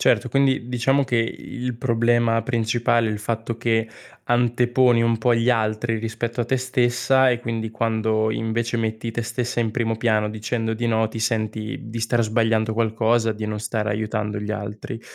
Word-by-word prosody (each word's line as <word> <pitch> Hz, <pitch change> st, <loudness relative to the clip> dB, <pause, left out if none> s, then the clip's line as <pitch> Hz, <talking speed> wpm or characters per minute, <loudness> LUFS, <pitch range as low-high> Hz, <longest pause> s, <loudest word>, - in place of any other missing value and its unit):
Certo, -, -, +3 dB
quindi 135 Hz, -3 st, +1 dB
diciamo 130 Hz, +3 st, +2 dB
che 125 Hz, -2 st, 0 dB
il 125 Hz, +2 st, -3 dB
problema 115 Hz, -1 st, +2 dB
principale 115 Hz, 0 st, +1 dB
è -, -, -1 dB
il 105 Hz, -, -3 dB
fatto 115 Hz, +1 st, -3 dB
che 115 Hz, -1 st, 0 dB, 0.4 s
anteponi 120 Hz, 0 st, +3 dB
un 115 Hz, -1 st, +2 dB
po' 120 Hz, +2 st, +3 dB
gli 115 Hz, +2 st, +2 dB
altri 110 Hz, 0 st, 0 dB
rispetto 115 Hz, +2 st, -3 dB
a -, -, +1 dB
te 130 Hz, +3 st, 0 dB
stessa 130 Hz, +1 st, +2 dB
e 120 Hz, -1 st, 0 dB
quindi 115 Hz, -2 st, -3 dB
quando, 110 Hz, -1 st, 0 dB
invece, 115 Hz, +2 st, -1 dB
metti 110 Hz, 0 st, -2 dB
te 120 Hz, +1 st, -3 dB
stessa 120 Hz, +2 st, -3 dB
in 115 Hz, -2 st, 0 dB
primo 115 Hz, -2 st, -1 dB
piano, 110 Hz, -2 st, +1 dB
dicendo 110 Hz, +1 st, -2 dB
di 120 Hz, +2 st, -2 dB
no, 110 Hz, -1 st, +2 dB
ti 110 Hz, -, -7 dB
senti 110 Hz, +1 st, -2 dB
di 115 Hz, +1 st, -5 dB
star 115 Hz, +1 st, +1 dB
sbagliando 110 Hz, 0 st, +1 dB
qualcosa, 115 Hz, 0 st, +1 dB
di 110 Hz, 0 st, -5 dB
non 105 Hz, 0 st, -3 dB
stare 110 Hz, +1 st, -2 dB
aiutando 105 Hz, 0 st, -2 dB
gli 105 Hz, +1 st, -5 dB
altri. 105 Hz, +2 st, -6 dB
115 Hz, 180 wpm, -23 LUFS, 110-120 Hz, 0.4 s, Certo